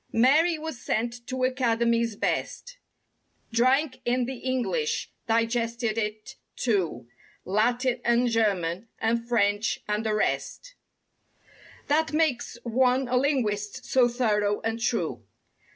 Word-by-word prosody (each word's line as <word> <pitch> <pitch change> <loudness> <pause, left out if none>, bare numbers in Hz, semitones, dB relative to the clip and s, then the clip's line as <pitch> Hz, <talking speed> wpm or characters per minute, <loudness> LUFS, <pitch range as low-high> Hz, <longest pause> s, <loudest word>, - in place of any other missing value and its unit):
Mary 305 +8 +4
was 310 -5 -6
sent 235 +2 -2
to 255 -1 -3
academies—best— 235 - 0 0.7
Drank 255 +3 +2
in 245 0 +1
the 260 +1 -5
English—digested 235 - -1
it, 215 -1 -4 0.2
too— 175 - -1 0.4
Latin 240 +5 +1
and 240 +1 +3
German 205 -4 0
and 230 +1 0
French 205 -2 +1
and 210 +1 -1
the 215 -1 0
rest - - -2 1.1
That 315 +2 +1
makes 305 -6 0
one 255 +2 +2
a 250 - +1
linguist 250 -4 0
so 255 -2 +4
thorough 210 -4 +1
and 225 +1 -2
true. 230 - -1
235 Hz, 105 wpm, -26 LUFS, 220-255 Hz, 1.1 s, Mary